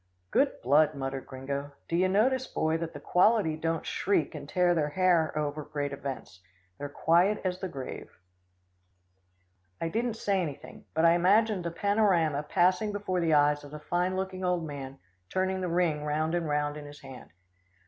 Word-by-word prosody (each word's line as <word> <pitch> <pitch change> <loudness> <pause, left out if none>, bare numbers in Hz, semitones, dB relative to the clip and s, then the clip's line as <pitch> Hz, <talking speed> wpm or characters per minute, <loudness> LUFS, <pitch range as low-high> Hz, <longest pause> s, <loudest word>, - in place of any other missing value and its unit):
"Good - - +1
blood," 150 +4 +4
muttered 135 -1 -4
Gringo. 140 +2 -5
"Do 170 - -2
you 185 +2 +3
notice, 255 +7 +2
Boy, 160 0 0
that 165 0 -4
the - - -8
quality 185 -3 +3
don't 165 0 -2
shriek 190 -7 0
and 145 -2 -8
tear 180 -1 +3
their 155 -3 0
hair 170 -1 +2
over 150 0 -2
great 145 -1 -4
events. 135 -9 -7 0.4
They're 145 0 -5
quiet 175 +8 +2
as 180 0 -1
the 190 - -3
grave." 135 -4 -7 1.7
I 165 - -2
didn't 230 +4 -1
say 200 -3 0
anything, 145 -4 -7
but 160 +1 +3
I 165 - +7
imagined 195 +3 +3
the 170 - -2
panorama 175 -6 +2
passing 185 +6 +2
before 205 -3 -2
the 165 -3 +2
eyes 145 0 +3
of 145 - -10
the 150 +1 -8
fine 180 +4 -1
looking 190 0 -4
old 180 -2 0
man 135 -2 -7 0.3
turning 190 0 -1
the 180 - -1
ring 165 -3 +1
round 155 +2 -1
and 170 -3 -1
round 145 0 0
in 145 -1 -8
his 145 0 -12
hand. 135 -2 -11
165 Hz, 180 wpm, -29 LUFS, 145-185 Hz, 1.7 s, I